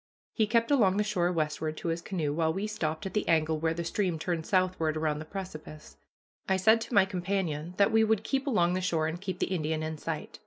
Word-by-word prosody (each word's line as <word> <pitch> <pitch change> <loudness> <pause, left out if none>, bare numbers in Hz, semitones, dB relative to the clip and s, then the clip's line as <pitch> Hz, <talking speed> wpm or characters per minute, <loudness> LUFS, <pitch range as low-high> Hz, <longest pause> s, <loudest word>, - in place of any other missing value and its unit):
He 220 -3 +2
kept 230 +3 +2
along 205 -9 +4
the 210 - +3
shore 180 -4 0
westward 155 -1 -2
to 170 - -3
his 165 +1 -2
canoe, 160 -6 -2
while 160 0 +1
we 190 +5 -2
stopped 160 -7 -3
at 195 - -4
the 210 - -1
angle 160 -1 +2
where 165 +1 0
the 170 - -3
stream 175 0 -1
turned 165 0 -3
southward 185 -5 +1
around 155 -1 0
the 155 - -7
precipice. 155 -4 -8 0.5
I 190 - +3
said 220 +4 +4
to 235 - -4
my 195 -1 +6
companion 180 -4 -2
that 200 +2 +4
we 220 0 +4
would 220 -1 +2
keep 270 +4 -1
along 180 -9 +2
the 185 - -1
shore 165 -4 0
and 160 +3 -3
keep 190 -2 -4
the 190 - -1
Indian 155 -2 -1
in 155 -1 -4
sight. - - -5
175 Hz, 235 wpm, -29 LUFS, 160-200 Hz, 0.5 s, my